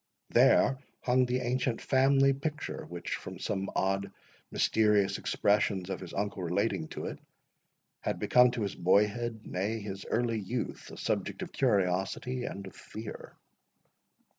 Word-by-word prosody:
There 135 - +5 0.2
hung 125 0 +3
the 125 +1 0
ancient 125 -1 0
family 135 +1 +4
picture, 150 +3 -4
which, 85 0 -4
from - - -8
some 95 0 -2
odd 95 +1 0 0.4
mysterious 105 -3 +2
expressions 100 -2 +1
of - - -3
his 90 -3 -8
uncle 100 -1 -2
relating 90 -1 0
to - - -6
it, - - -5 0.8
had - - -2
become 125 0 +5
to 110 - 0
his 100 - -2
boyhood, 105 +5 +2
nay, 105 +5 -2
his 100 -2 -6
early 115 -1 +1
youth, 115 +4 -4
a - - -10
subject - - -2
of - - -7
curiosity 100 +7 0
and 100 - -5
of 95 - -11
fear. 110 0 -9
105 Hz, 140 wpm, -30 LUFS, 95-125 Hz, 0.8 s, There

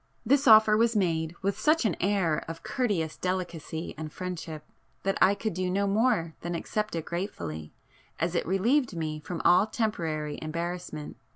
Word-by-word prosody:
This 275 +4 +3
offer 215 -1 +8
was 230 +1 +3
made 165 -4 0
with 200 +2 0
such 305 +3 +3
an 195 - +2
air 185 -5 +1
of 165 0 -7
courteous 195 -11 -1
delicacy 175 -3 -3
and 155 -1 -5
friendship, 165 -4 -6 0.4
that 195 0 0
I 200 - +6
could 215 0 -3
do 185 +1 -1
no 200 +2 +1
more 200 -5 +2
than 175 0 -3
accept 210 +4 -2
it 165 -1 -3
gratefully, 80 - -5 0.5
as 170 +2 0
it 170 - -1
relieved 225 - +2
me 155 -1 -3
from 170 +2 -5
all 180 +4 +6
temporary 160 -10 -2
embarrassment. 170 -1 -5
180 Hz, 165 wpm, -28 LUFS, 160-210 Hz, 0.5 s, offer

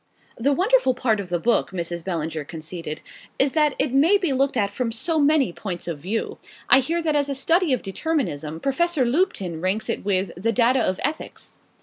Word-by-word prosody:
"The 270 +5 +1
wonderful 375 - +3
part 230 -4 +1
of 195 -3 -6
the 175 - 0
book," 235 +8 +1
Mrs. 170 -2 -4
Bellinger 160 -3 -3
conceded, 160 0 -7 0.4
"is 270 0 +2
that 300 -2 +2
it 270 -2 0
may 320 +9 +5
be 355 -8 -1
looked 270 0 +1
at 200 -2 +1
from 240 +1 -2
so 315 +8 0
many 290 - +3
points 180 -3 -6
of 165 -4 -4
view. 195 +9 -3 0.3
I 270 - +9
hear 330 +6 -1
that 310 -2 +1
as 285 -1 +1
a 275 - -1
study 330 +4 +2
of 255 - 0
determinism 195 - -2
Professor 290 0 +1
Lupton 235 - 0
ranks 190 +4 -1
it - - -2
with 190 -2 0
'The 225 +7 -1
Data 250 +2 +3
of 185 - -1
Ethics. 305 +3 -5
245 Hz, 200 wpm, -23 LUFS, 180-295 Hz, 0.4 s, I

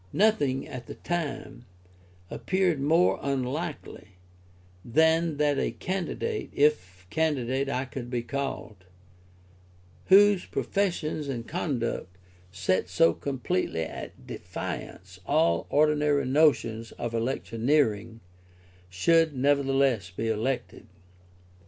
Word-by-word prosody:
Nothing, 145 -11 +2
at 125 -2 -8
the - - -8
time, 140 -7 -4 0.6
appeared 185 -6 0
more 165 +5 +3
unlikely 140 - -4 0.7
than 160 +4 +2
that 145 -1 +2
a - - 0
candidate 195 - -3
(if 90 -12 +1
candidate 135 -4 0
I 130 -1 -1
could 125 -1 -7
be 120 -1 -2
called) 125 -7 -5 1.2
whose 200 0 +6
professions 170 -7 -1
and 120 -4 -4
conduct 120 - -3 0.3
set 95 0 0
so 85 -2 +4
completely 115 -11 -2
at 80 - -8
defiance - - -7
all 85 0 +2
ordinary 150 -1 +2
notions 130 -5 +2
of 120 -1 -5
electioneering, 115 -1 0 0.7
should 160 - +3
nevertheless 135 -6 +2
be 110 +5 -3
elected. 115 +4 -3
135 Hz, 95 wpm, -27 LUFS, 115-155 Hz, 1.2 s, whose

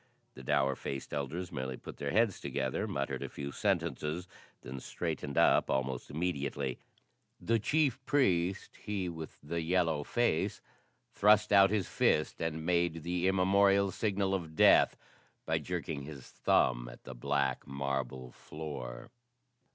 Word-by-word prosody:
The - - -11
dour 70 +1 +1
faced 70 +1 -6
elders 80 +6 -3
merely 65 -4 -4
put - - -10
their 70 - -3
heads 110 +3 +2
together, 65 -2 -2
muttered 70 0 -3
a - - -4
few 70 0 -6
sentences, 80 +5 -1 0.4
then 65 +1 -6
straightened 70 +2 -4
up - - +4
almost 65 -1 -1
immediately. 70 -5 -2 0.6
The 115 0 +1
chief 135 +2 +1
priest 95 -10 +1
he 100 -3 -3
with 80 -2 -8
the 85 +3 -2
yellow 80 -3 +1
face 120 -4 0 0.5
thrust 105 0 +4
out 100 -1 +7
his 105 -4 0
fist 75 - +1
and 80 -1 -2
made 85 -2 +1
the 90 +2 0
immemorial 100 +1 +4
signal 100 -2 0
of 85 -5 -3
death - - +6 0.5
by - - +1
jerking 80 -4 -4
his 70 -2 -9
thumb - - +2
at - - -13
the 65 - -8
black 70 +4 -1
marble 70 -2 -3
floor. 70 - -7
80 Hz, 140 wpm, -32 LUFS, 70-95 Hz, 0.6 s, out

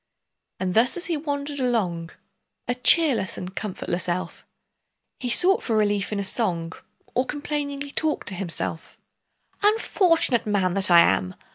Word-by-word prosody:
And 185 -1 -2
thus 235 - +2
as 355 - -1
he 340 - -1
wandered 285 -1 -4
along, 190 -10 -1 0.6
A 245 - 0
cheerless 250 - +3
and 185 +1 -8
comfortless 180 -3 -4
elf, 180 +1 -5 0.7
He 250 - -4
sought 360 +10 +5
for 225 -3 -1
relief 205 -1 0
in 210 - -2
a - - -2
song, 175 -6 0 0.4
Or 255 - +1
complainingly 285 0 -5
talked 310 0 -2
to - - -8
himself:— 175 -3 -4 0.6
"Unfortunate 365 - +2
man 190 -4 0
that 195 0 +4
I 170 -1 +7
am! 95 - +1
225 Hz, 145 wpm, -23 LUFS, 185-285 Hz, 0.7 s, I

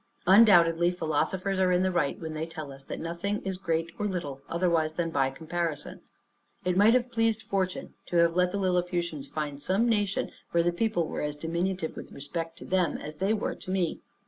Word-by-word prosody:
Undoubtedly 175 -4 +6
philosophers 180 +3 -1
are 185 -1 +3
in 180 +1 +3
the 185 - +2
right 150 -6 0
when 160 -1 -5
they 155 +1 -3
tell 155 -3 -7
us 135 0 -11
that - - -6
nothing 170 +5 -2
is 190 -1 -3
great 165 -3 -1
or 210 - 0
little 145 -8 -4
otherwise 165 -2 +1
than 165 -1 -1
by 135 -3 +2
comparison. 160 +2 -4 0.6
It 180 -1 +1
might 210 +5 +6
have 250 0 +1
pleased 225 -1 +1
fortune, 190 -2 -2
to - - -4
have 170 0 +4
let 180 0 +3
the 200 - -3
Lilliputians 175 -5 -1
find 145 -2 -4
some 195 +9 +2
nation 205 -4 0 0.2
where 170 0 +2
the 175 - +2
people 175 -3 0
were - - -4
as 150 0 -2
diminutive 170 +2 -2
with - - -9
respect 165 +4 -5
to - - -10
them, 185 -2 +1
as 150 0 -8
they 195 +4 +1
were 220 - 0
to - - -11
me. 185 -3 0
175 Hz, 200 wpm, -28 LUFS, 160-190 Hz, 0.6 s, Undoubtedly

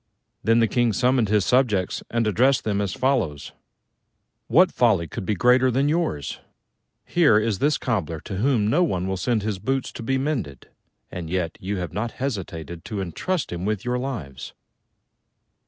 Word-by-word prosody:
Then 115 +3 +4
the 115 - +4
King 120 +1 +1
summoned 125 +1 +2
his 105 -2 +2
subjects 110 -8 +1
and 115 0 0
addressed 125 +6 +3
them 100 -2 0
as 100 -2 -1
follows: 120 - -1 1.0
"What 180 +2 +5
folly 105 -9 +2
could 95 - -6
be 105 - +1
greater 125 +5 +4
than 135 +3 +1
yours? 155 - -1 0.7
Here 155 -11 +4
is 110 -2 0
this 150 0 +2
Cobbler 90 - -2
to 100 - -6
whom 115 -1 +2
no 160 +11 +3
one 95 - -1
will 95 - -1
send 110 +3 0
his 105 -3 -2
boots 135 +6 -2
to - - -8
be 135 +4 0
mended, 130 - -3 0.4
and 85 -3 -6
yet 90 -2 -2
you 100 +2 -3
have 90 -4 -4
not 115 +3 -3
hesitated 85 - -5
to 105 - -4
entrust 150 - -2
him 85 0 -4
with 105 +2 -2
your 125 0 0
lives!" 75 - -6
110 Hz, 170 wpm, -24 LUFS, 95-130 Hz, 1.0 s, What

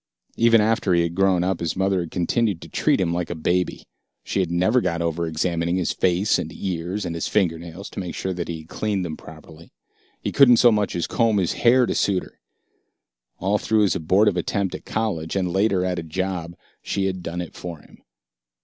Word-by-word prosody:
Even 115 -1 +5
after 105 -4 +2
he 85 - +3
had 85 0 -2
grown 95 -1 +2
up, 95 -1 -1
his 85 -2 -2
mother 95 0 +1
had 85 -2 -4
continued 95 +2 0
to - - -9
treat - - +1
him 85 -3 0
like 85 -1 -2
a 85 - -3
baby. 90 +3 -1 0.4
She - - -2
had 90 -3 0
never 95 +9 +2
got 85 -5 -1
over 85 0 -1
examining 85 +2 -1
his 90 -2 0
face 95 +3 +1
and 80 - -4
his - - -12
ears 95 +2 -3
and 85 - -3
his 85 - -3
fingernails 85 -1 -1
to - - -6
make 90 -3 -5
sure 95 - -3
that 85 -1 -4
he 80 -2 -5
had 80 - -17
cleaned 100 -2 -2
them 80 -2 -4
properly. 80 +1 -14 0.5
He - - -3
couldn't 125 -4 +6
so 120 +1 +6
much 105 -2 0
as 85 - -1
comb 115 -3 +1
his 90 -4 +1
hair 125 +1 +4
to - - -1
suit 95 -3 +1
her; - - -16 1.0
all 100 +3 0
through 110 -1 +2
his 100 -3 +2
abortive 95 +3 +2
attempt 95 +2 -1
at - - -7
college, 100 -8 -2
and 90 -3 -1
later 95 -2 +2
at 90 -1 -1
a - - -5
job, 85 0 -3 0.3
she 100 - -2
had 95 -1 -2
done 85 0 -5
it 90 - -6
for 85 -2 -7
him. - - -19
90 Hz, 220 wpm, -23 LUFS, 85-100 Hz, 1.0 s, couldn't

